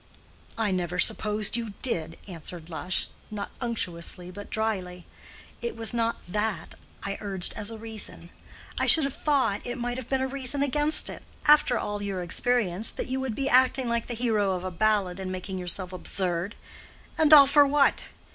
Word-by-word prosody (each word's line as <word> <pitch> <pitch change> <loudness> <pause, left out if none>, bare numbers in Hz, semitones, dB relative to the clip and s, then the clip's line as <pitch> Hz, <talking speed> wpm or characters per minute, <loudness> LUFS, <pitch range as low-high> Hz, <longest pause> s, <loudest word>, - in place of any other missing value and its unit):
"I 220 -3 0
never 180 -1 -2
supposed 210 +3 +2
you 230 -4 -3
did," 165 -10 -1
answered 170 -2 -7
Lush, 180 +3 +1 0.2
not 205 -1 -6
unctuously 180 -6 -3
but 205 +2 -10
dryly. 185 -5 -3 0.6
"It 235 - -4
was 225 +1 -1
not 230 -1 0
that 210 -2 -2 0.3
I 200 0 -4
urged 195 -3 0
as 205 - -4
a 225 - -8
reason. 220 -5 -5 0.5
I - - +1
should 320 - +10
have 275 -1 -2
thought 275 -9 0
it 245 +1 -5
might 245 0 -3
have 250 - -10
been 265 -1 0
a - - 0
reason 275 +1 0
against 295 +2 +1
it, - - -4 0.2
after 295 -5 +5
all 205 -1 -3
your 195 -3 -3
experience, 215 +1 0
that - - -5
you 260 +1 -1
would 260 -4 -3
be 275 +3 -2
acting 260 0 +3
like 235 -1 -1
the 240 - -4
hero 215 -5 +1
of 180 -1 -4
a 185 - -4
ballad, 195 0 +1
and 185 -1 -4
making 185 +1 -5
yourself 180 +1 -4
absurd—and 185 - -3
all 290 -2 +10
for 285 +1 +5
what? 280 0 +2
215 Hz, 175 wpm, -26 LUFS, 185-250 Hz, 0.6 s, should